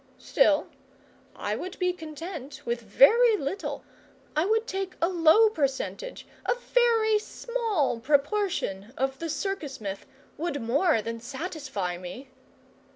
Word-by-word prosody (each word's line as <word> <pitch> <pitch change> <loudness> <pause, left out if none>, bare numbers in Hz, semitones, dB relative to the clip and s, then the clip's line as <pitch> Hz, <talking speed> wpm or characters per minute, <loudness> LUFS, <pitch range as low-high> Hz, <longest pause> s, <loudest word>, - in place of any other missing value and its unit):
Still, - - +3 0.7
I - - -2
would 370 +1 -6
be 360 -1 +1
content 310 -4 -8
with 235 0 -1
very 430 - +6
little, 375 +6 -4 0.5
I 310 +3 +2
would 445 +2 +2
take 385 -4 -4
a 335 - +3
low 355 +5 +6
percentage 290 - -2 0.2
a - - +1
very 460 -3 +3
small 425 - -1
proportion 285 - 0
of 270 0 -1
the 330 - -4
circus 320 -4 -3
myth 200 -2 -6 0.3
would 325 -2 -2
more 250 - +2
than 230 +1 -4
satisfy 260 - -4
me. 185 +10 -8
315 Hz, 125 wpm, -27 LUFS, 260-395 Hz, 0.7 s, very